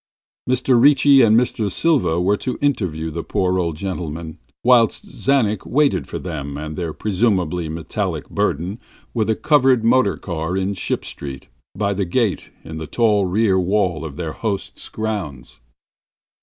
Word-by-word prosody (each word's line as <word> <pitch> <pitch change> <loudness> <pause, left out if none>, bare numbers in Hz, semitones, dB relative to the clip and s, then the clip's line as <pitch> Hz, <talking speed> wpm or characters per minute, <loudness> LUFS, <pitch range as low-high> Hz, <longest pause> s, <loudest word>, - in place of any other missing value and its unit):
Mr. 125 -1 +3
Ricci 140 -1 +6
and 110 -2 +5
Mr. 120 -4 -1
Silva 135 - +2
were 95 +4 +2
to 125 +4 -4
interview 90 - -1
the 85 +2 -4
poor 95 +2 0
old 85 -3 -1
gentleman, 85 -4 -5 0.2
whilst 120 -3 +4
Mr. - - -11
Czanek 110 -8 +2
waited 145 +1 +1
for - - -5
them 70 -5 -5
and 75 +1 -6
their 85 -1 -3
presumably 90 -4 0
metallic 80 +1 -3
burden 95 +7 -2 0.3
with 110 -2 0
a 110 - +2
covered 135 -5 +3
motor 115 -3 +3
car 85 0 -3
in 95 +1 -1
Ship 95 - -3
Street, 70 -2 -8 0.3
by 100 0 0
the 100 0 -1
gate 105 +2 -1
in 80 0 -7
the 80 - -6
tall 105 0 +2
rear 95 0 +2
wall 90 -3 0
of 75 -2 -7
their 80 -3 -4
host's 105 -4 -4
grounds. 100 -12 -5
95 Hz, 155 wpm, -20 LUFS, 85-115 Hz, 0.3 s, Ricci